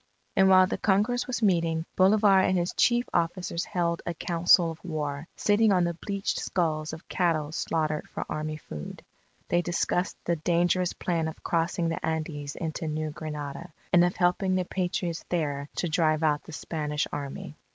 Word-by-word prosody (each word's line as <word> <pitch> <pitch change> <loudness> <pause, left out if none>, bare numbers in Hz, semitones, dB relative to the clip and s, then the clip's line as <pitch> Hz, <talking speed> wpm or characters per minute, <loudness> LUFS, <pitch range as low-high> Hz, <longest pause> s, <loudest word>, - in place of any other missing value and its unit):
And 190 -1 +5
while 185 0 +7
the - - -3
Congress 215 +5 +1
was 245 -2 -2
meeting, 165 -4 +2
Bolivar 195 +1 +5
and 185 0 +2
his 175 0 -1
chief 240 0 +3
officers 170 0 -1
held 170 -4 -1
a 170 - -4
council 170 0 +3
of 160 - -12
war, 150 -3 -4
sitting 210 +1 +3
on 175 -3 +2
bleached 200 -1 -2
skulls 155 -4 -1
of 160 +2 -10
cattle 160 -4 0
slaughtered 155 -2 -1
for - - -5
army 155 0 -3
food. 75 - -8 0.5
They 175 - +3
discussed 175 +1 -1
the 170 0 +1
dangerous 175 +2 +1
plan 165 -3 -1
of 160 - -8
crossing 170 0 0
the 165 - -4
Andes 155 -2 -3
into 160 0 -4
New 155 0 -2
Granada, 150 +2 -6 0.2
and 175 -1 +7
of 175 0 +1
helping 185 +1 +2
the 185 -1 0
Patriots 175 -2 -2
there 145 -4 -2
to 175 - -1
drive 160 -2 +2
out 150 -2 +1
the - - -10
Spanish 150 -2 -2
Army. 145 +1 -6
170 Hz, 170 wpm, -27 LUFS, 155-185 Hz, 0.5 s, while